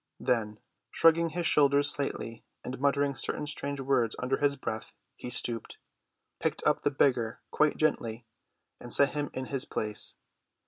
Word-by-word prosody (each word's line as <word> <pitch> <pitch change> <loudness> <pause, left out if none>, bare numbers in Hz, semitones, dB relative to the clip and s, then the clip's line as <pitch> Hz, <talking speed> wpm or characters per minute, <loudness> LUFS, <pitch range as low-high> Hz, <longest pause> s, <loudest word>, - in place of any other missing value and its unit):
Then, 105 -3 -1 0.3
shrugging 165 0 +4
his 170 +2 -3
shoulders 145 -2 +4
slightly 115 -5 -4 0.2
and 125 +1 -6
muttering 140 0 +1
certain 150 - +1
strange 145 -1 -2
words 130 -4 0
under 130 +2 -1
his 145 -1 +1
breath, 110 -5 -6 0.2
he - - -8
stooped, 120 -2 0 0.6
picked - - -2
up - - +2
the - - +1
beggar 125 -5 0
quite 150 0 +1
gently, 115 -6 -1 0.5
and 120 - -10
set 140 +3 +5
him 145 -1 -3
in 130 - -4
his 135 - +2
place. 105 -1 0
135 Hz, 150 wpm, -29 LUFS, 120-145 Hz, 0.6 s, set